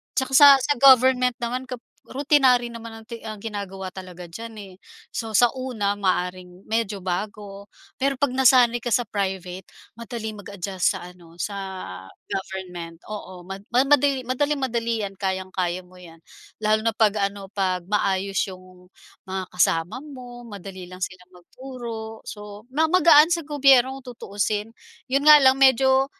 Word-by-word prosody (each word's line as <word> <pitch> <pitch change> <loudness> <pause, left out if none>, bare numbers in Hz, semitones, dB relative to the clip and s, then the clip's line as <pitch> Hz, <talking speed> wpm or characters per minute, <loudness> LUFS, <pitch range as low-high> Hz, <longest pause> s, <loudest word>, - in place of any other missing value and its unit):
'Tsaka 265 0 -1
sa 290 - +10
sa 290 +2 +1
government 255 -2 +6
naman 250 +2 -3
kap 250 -2 -7 0.2
routinary 265 -3 +3
naman 230 -1 -9
ang - - -18
ti 235 - -6
ang 215 -2 -7
ginagawa 200 -3 -6
talaga 180 -2 -10
diyan, 225 +6 -8
eh. 190 -2 -12 0.4
So 225 -2 -5
sa 240 +3 +5
una, 220 -6 -2
maaaring 180 -1 -2
medyo 220 -3 -1
bago, 200 +2 -5 0.3
pero 275 +1 +1
'pag 285 +2 0
nasanay 250 -2 +4
ka 240 -1 -3
sa 240 -2 0
private, 190 -2 -4 0.3
madaling 220 -2 -6
mag-adjust 195 -1 -2
sa 190 - -7
ano, 175 -2 -13
sa 200 -1 -3 0.7
government. 180 -3 -6
Oo 190 -4 -8
ma 195 +2 -7 0.2
ma 250 - +5
madali 280 -2 +3
madaling-madali 255 -4 -1
'yan, 195 -1 -5
kayang-kaya 185 -2 -2
mo 180 0 -19
'yan. 165 -2 -14 0.4
Lalo 215 +1 +1
na 230 - +2
'pag 210 -2 +2
ano, 200 -1 -7
'pag 185 -3 -1
maayos 195 -1 0
'yong 185 -1 -13 0.4
mga 190 -1 -5
kasama 170 +3 +1
mo, 250 -4 -11
madali 195 -4 -9
lang 185 +1 -12
silang 185 0 -6
magturo, 225 +2 -9
so 210 +2 -10
ma 305 +5 +2
magaan 330 -1 +6
sa 335 - -1
gobyerno 270 -3 +3
kung 250 -2 -10
tutuusin. 205 0 -3 0.4
'Yon 275 +2 +1
nga 300 -1 +9
lang 265 0 +5
medyo, 265 0 +4
215 Hz, 155 wpm, -23 LUFS, 190-255 Hz, 0.7 s, sa